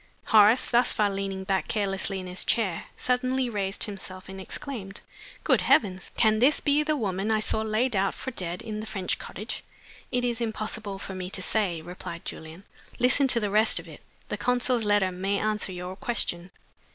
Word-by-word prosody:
'" - - -35
Horace 215 +3 +7
thus 240 +1 +3
far 210 -2 +2
leaning 195 -1 -3
back 190 0 0
carelessly 195 -2 0
in 185 - -7
his 180 +1 -1
chair 200 -8 0
suddenly 255 0 0
raised 195 -2 -1
himself 190 -2 -7
and 190 0 -7
exclaimed, 200 -2 -6 0.4
"Good - - +3
heavens! 190 -3 +2
can 220 -2 +4
this 270 +6 +4
be 290 +1 +3
the 305 0 0
woman 200 -3 -1
I 220 -1 +3
saw 215 0 0
laid 220 +2 0
out 195 0 +1
for 260 - -5
dead 180 -6 -4
in 215 -1 -5
the 215 - -6
French 190 -4 -1
cottage?" 215 +5 -6 0.5
"It 245 -1 0
is 240 -1 -1
impossible 215 -2 -3
for 195 - -7
me 185 -1 -5
to 185 -1 -1
say," 180 -6 0
replied 175 -1 -8
Julian. 160 +4 -8 0.3
"Listen 260 +3 +4
to 245 -2 +3
the 210 -3 -2
rest 215 +2 +6
of - - -2
it. - - -12 0.3
The - - -2
consul's 250 -2 +2
letter 205 -2 +3
may 195 +2 -1
answer 210 -2 0
your 180 +1 -6
question." 185 -5 -1
205 Hz, 190 wpm, -27 LUFS, 190-230 Hz, 0.5 s, Horace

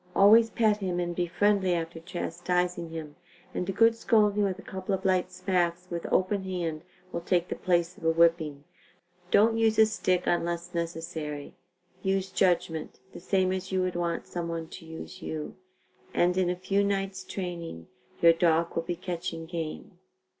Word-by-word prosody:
Always 220 +3 +7
pet 220 -2 +2
him 185 -3 -2
and 175 -1 -2
be 175 0 0
friendly 190 0 +2
after 165 0 -4
chastising 175 0 -2
him, 160 -2 -7 0.4
and 180 - -2
a - - +2
good 225 +3 +4
scolding 210 -3 +3
with 190 -2 0
a - - -11
couple 190 +1 -3
of 190 +1 -8
light 185 -1 +2
smacks 175 -3 0
with 170 -1 -4
open 190 +1 +2
hand 170 -4 -3 0.3
will 170 - -3
take 175 0 +1
the - - -2
place 175 -1 +1
of - - -16
a - - +5
whipping. 165 -3 +2 0.7
Don't 225 +3 +4
use 225 -1 +3
a 220 - +8
stick 185 -4 0
unless 175 +1 -1
necessary. 165 -3 -4 0.5
Use 190 0 0
judgment, 175 -4 0
the - - -8
same 185 +1 +1
as 190 0 -4
you 185 -1 +1
would 185 -1 -2
want 170 -1 -1
some 175 -1 -4
one 165 -1 -4
to 165 -3 -10
use 160 +3 -9
you, 155 -2 -5 0.6
and 175 +1 +3
in 185 -1 +2
a 180 - 0
few 195 +2 +1
nights' 195 -1 -1
training 170 - -5 0.4
your 170 0 +9
dog 165 0 +2
will 165 - +1
be 175 +1 -3
catching 170 -2 -4
game. 165 +2 -6
175 Hz, 175 wpm, -28 LUFS, 170-190 Hz, 0.7 s, your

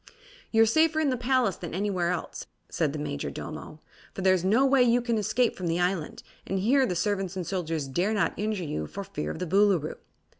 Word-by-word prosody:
"You're 225 0 +5
safer 315 +7 +3
in 300 -3 +2
the - - +1
palace 250 -4 +1
than 170 -2 -6
anywhere 185 -3 0
else," 180 -2 -4 0.2
said 155 -4 0
the 155 - -5
Majordomo, 150 - -6 0.3
"for 190 - -4
there 190 0 +5
is 180 -2 0
no 220 +8 +4
way 270 -1 +4
you 245 0 +4
can 235 -2 0
escape 235 +3 +1
from 180 - -4
the 165 +1 0
island, 180 -3 -1 0.2
and 195 - -1
here 255 +8 +3
the 180 - -2
servants 195 0 -1
and 185 -2 -3
soldiers 165 -5 -2
dare 175 +10 0
not 205 - +1
injure 210 -3 -2
you 75 - -3
for - - -6
fear 75 - -5
of - - -5
the 180 - -3
Boolooroo." 190 -3 +2
190 Hz, 215 wpm, -27 LUFS, 170-230 Hz, 0.3 s, You're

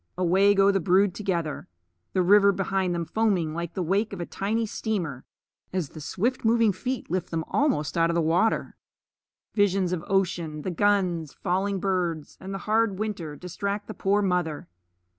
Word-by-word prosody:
Away 190 +3 +4
go 195 0 +5
the 195 - +1
brood 185 +2 +3
together, 170 -7 -3 0.5
the 185 - +2
river 200 +2 +6
behind 190 -2 -1
them 170 -1 -2
foaming 185 -4 0
like 170 0 -5
the 185 - -1
wake 200 +5 0
of 195 - -6
a 175 - -3
tiny 220 +6 -1
steamer 180 - -3 0.5
as 180 -6 -2
the 155 - -10
swift 230 - -1
moving 225 -1 +4
feet 250 +1 -4
lift 185 -1 -1
them 165 -1 -2
almost 265 - 0
out 165 -1 +3
of 170 - 0
water. 175 +8 +1 0.8
Visions 195 -3 +2
of 170 -2 -3
ocean, 175 -6 -1
the 185 - -2
guns, 180 -5 +1
falling 190 +2 -1
birds, 175 -5 -2
and 190 - -7
the 195 - -3
hard 215 -2 +2
winter 190 -8 -4
distract 200 +5 -4
the 215 - -7
poor 200 +2 +1
mother. 180 -5 -1
190 Hz, 170 wpm, -26 LUFS, 170-205 Hz, 0.8 s, river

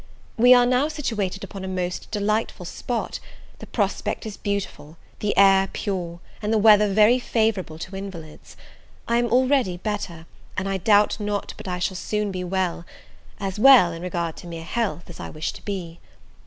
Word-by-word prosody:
We 245 +2 +5
are 250 +4 +3
situated 215 - -3
upon 195 -2 -7
a - - -4
most 180 -1 -3
delightful 210 -2 -1
spot; 235 +6 -4 0.4
the - - -10
prospect - - -2
is 215 -2 -6
beautiful, 195 -6 -4 0.2
the 210 - -1
air 195 -1 +6
pure, 175 -5 -4 0.2
and 210 0 -2
the 225 - +3
weather 210 -1 +6
very 215 +5 +5
favourable 220 -9 -1
to 185 +4 -7
invalids. 180 -6 -9 0.5
I 235 - +2
am 240 0 +2
already 255 -5 +2
better, 180 -4 -4 0.3
and 190 - -1
I 195 0 -1
doubt 205 +3 +3
not 205 -1 -3
but - - -10
I 180 -1 -2
shall 180 +1 -2
soon 210 +1 -2
be 185 -1 -4
well; 180 -2 -1 0.6
as 195 0 -4
well, 250 -8 +7
in 165 0 -7
regard 170 -2 -3
to - - -10
mere 165 -1 -7
health, 200 -1 -2
as 175 - -11
I - - -6
wish 155 0 -4
to - - -13
be. 175 -5 -5
195 Hz, 175 wpm, -23 LUFS, 180-220 Hz, 0.6 s, well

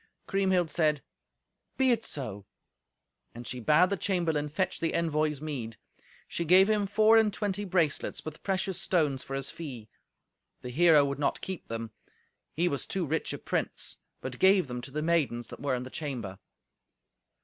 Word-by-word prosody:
Kriemhild 190 -4 +1
said, 150 -3 +1 0.7
"Be 265 -1 +4
it 230 -2 +1
so." 105 - -5 0.9
And 120 +1 -8
she 125 +1 -4
bade 155 - +4
the 200 - +1
chamberlain 165 -6 0
fetch 185 +5 -1
the 165 - -1
envoy's 155 -3 0
meed. 125 -8 -5 0.5
She 170 - -3
gave 185 +4 +6
him 210 -2 +1
four 215 +2 +5
and 220 -2 +4
twenty 205 0 -2
bracelets 170 -6 0
with 155 -1 -7
precious 190 -1 0
stones 150 -7 +1
for 135 - -6
his 135 0 -3
fee. 125 -10 -8 0.7
The 125 - -6
hero 155 0 +6
would 140 0 -3
not 145 - 0
keep 190 -2 -6
them: 115 -1 -5 0.6
he 170 +3 +1
was 140 -5 -1
too 190 -3 -1
rich 160 +2 -1
a - - -4
prince, - - -3 0.2
but 130 -1 -6
gave 190 -4 +5
them 125 -1 -5
to 130 - -8
the 150 +3 -3
maidens 145 -8 0
that - - -9
were 140 -2 0
in 125 - -4
the 130 - -9
chamber. 120 -11 -5
155 Hz, 170 wpm, -29 LUFS, 135-185 Hz, 0.9 s, gave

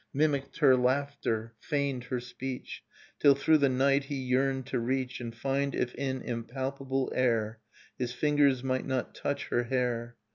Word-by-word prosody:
Mimicked 140 -2 +1
her 135 -4 +6
laughter, 125 -3 0
feigned 140 -4 -1
her 125 0 -2
speech. 125 +1 -6 0.4
Till 140 -1 +6
through 155 +3 +4
the 140 -1 +4
night 135 +2 +3
he 145 - -4
yearned 130 0 0
to 130 -1 -1
reach 130 +1 -1
And 115 -1 -6
find 135 +3 -1
if 125 - -1
in 130 -2 -3
impalpable 130 +3 -3
air 115 -3 +1 0.4
His 125 -1 -1
fingers 140 -1 +3
might 130 -1 -1
not 130 -2 -2
touch 140 0 -3
her 120 - +1
hair. 120 -1 -1
130 Hz, 155 wpm, -30 LUFS, 125-140 Hz, 0.4 s, her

